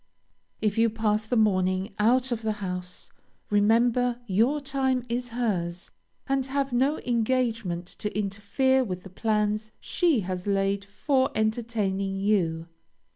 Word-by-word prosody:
If 215 0 +1
you 230 0 +5
pass 215 -1 0
the 245 - 0
morning 185 -2 +2
out 250 +4 +3
of 235 -1 -1
the 220 -1 0
house, 180 -3 -5 0.4
remember 235 +4 +3
your 235 +8 +2
time 270 -2 0
is 245 +1 -2
hers, 190 -7 -2 0.3
and 270 -1 +1
have 275 -1 -1
no 270 +5 +2
engagement 230 -7 0
to 210 -1 -3
interfere 210 +6 +1
with 185 -6 -5
the 190 - -11
plans 215 +1 0
she 330 - +1
has 185 0 -4
laid 195 0 +1
for 260 +6 +1
entertaining 215 -3 -1
you. 180 -5 0
215 Hz, 130 wpm, -27 LUFS, 195-245 Hz, 0.4 s, you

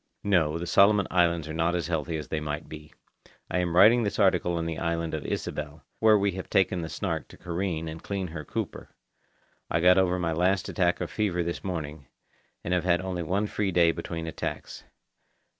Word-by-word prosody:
(No, 85 -6 +2
the 85 - -4
Solomon 100 +2 +5
Islands 85 -3 +2
are 80 - -5
not 85 +2 +1
as 85 - -1
healthy 80 -1 -2
as 75 - -7
they 80 - -1
might 75 +1 -4
be. 75 -1 -10 0.6
I 90 - +1
am 85 -1 -1
writing 110 +6 +7
this 105 -3 -2
article 90 -3 +2
on 85 - -2
the 80 -1 -3
island 85 -1 -2
of 80 - -3
Ysabel, 75 0 -4 0.2
where 110 -1 +6
we 100 0 +1
have 95 0 -7
taken 95 -2 +2
the 80 - -5
Snark - - -3
to - - -15
careen 85 -2 -3
and 80 +1 -7
clean 95 -3 -3
her 80 -1 -6
cooper. - - -6 0.7
I 85 - +1
got 90 +2 +6
over 90 -1 +2
my 85 -2 -1
last 90 +4 +1
attack 90 -3 +1
of 90 - -3
fever 95 -5 0
this 85 0 -4
morning, 75 -6 -5 0.6
and 90 - -1
I - - +4
have 85 - -2
had 85 -1 +2
only 95 -2 -3
one 95 +6 0
free 105 -1 -1
day 85 -2 +4
between 85 0 -5
attacks. 80 - -6
85 Hz, 210 wpm, -27 LUFS, 80-95 Hz, 0.7 s, writing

